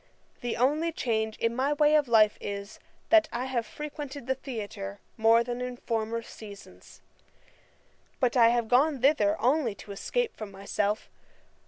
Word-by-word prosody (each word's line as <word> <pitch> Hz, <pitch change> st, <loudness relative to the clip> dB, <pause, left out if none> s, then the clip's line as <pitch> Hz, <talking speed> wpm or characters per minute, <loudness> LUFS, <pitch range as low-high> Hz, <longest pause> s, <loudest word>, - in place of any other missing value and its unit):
The 240 Hz, -1 st, -2 dB
only 300 Hz, +7 st, +2 dB
change 220 Hz, -7 st, -1 dB
in 230 Hz, 0 st, 0 dB
my 270 Hz, +3 st, +1 dB
way 295 Hz, 0 st, +3 dB
of 300 Hz, -3 st, +4 dB
life 215 Hz, -3 st, +5 dB
is, 200 Hz, 0 st, -6 dB, 0.3 s
that 325 Hz, -1 st, +6 dB
I 245 Hz, +2 st, -3 dB
have 240 Hz, -4 st, -2 dB
frequented 290 Hz, -2 st, -7 dB
the 265 Hz, -, +1 dB
theatre 205 Hz, -6 st, -6 dB, 0.2 s
more 225 Hz, +1 st, +5 dB
than 240 Hz, +1 st, -4 dB
in 250 Hz, 0 st, -4 dB
former 230 Hz, -1 st, -2 dB
seasons. 205 Hz, -3 st, -13 dB, 1.2 s
But 250 Hz, -2 st, +1 dB
I 235 Hz, -2 st, +7 dB
have 235 Hz, -1 st, +1 dB
gone 270 Hz, +3 st, +3 dB
thither 300 Hz, +3 st, +3 dB
only 250 Hz, -4 st, +1 dB
to 200 Hz, -, -11 dB
escape 485 Hz, -, -2 dB
from 215 Hz, -2 st, -7 dB
myself. 200 Hz, +2 st, -2 dB
240 Hz, 155 wpm, -28 LUFS, 220-280 Hz, 1.2 s, I